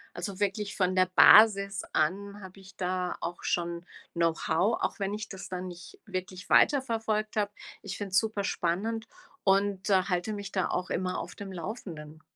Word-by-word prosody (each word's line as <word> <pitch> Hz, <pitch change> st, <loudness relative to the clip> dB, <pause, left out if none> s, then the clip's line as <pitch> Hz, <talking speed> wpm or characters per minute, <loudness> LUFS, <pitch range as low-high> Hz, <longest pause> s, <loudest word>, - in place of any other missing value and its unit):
also, 185 Hz, +2 st, -5 dB
wirklich 205 Hz, 0 st, -1 dB
von 185 Hz, -1 st, +1 dB
der 185 Hz, 0 st, +4 dB
Basis 200 Hz, -2 st, +7 dB
an 200 Hz, +6 st, 0 dB
habe 190 Hz, 0 st, -11 dB
ich 190 Hz, 0 st, -15 dB
da 180 Hz, -1 st, -2 dB
auch 175 Hz, -, -5 dB
schon 170 Hz, 0 st, -2 dB, 0.3 s
Know-how, 170 Hz, +4 st, +1 dB
auch -, -, -2 dB
wenn 195 Hz, +1 st, -1 dB
ich 215 Hz, +1 st, -4 dB
das 190 Hz, -1 st, -9 dB
dann 185 Hz, 0 st, -4 dB
nicht 180 Hz, -, -11 dB
wirklich 185 Hz, +1 st, -6 dB
weiterverfolgt 225 Hz, -6 st, +2 dB
habe. 205 Hz, -1 st, 0 dB, 0.3 s
Ich 195 Hz, -1 st, -6 dB
finde 200 Hz, -2 st, -5 dB
es 190 Hz, -, +5 dB
super 215 Hz, -3 st, -2 dB
spannend 215 Hz, +6 st, -1 dB, 0.4 s
und 195 Hz, 0 st, +2 dB
halte 185 Hz, +1 st, +1 dB
mich 200 Hz, -1 st, -6 dB
da 190 Hz, -, 0 dB
auch 180 Hz, -, -2 dB
immer 180 Hz, 0 st, -1 dB
auf -, -, -7 dB
dem 200 Hz, -1 st, -8 dB
Laufenden. 165 Hz, -5 st, -7 dB
195 Hz, 170 wpm, -29 LUFS, 180-205 Hz, 0.4 s, Basis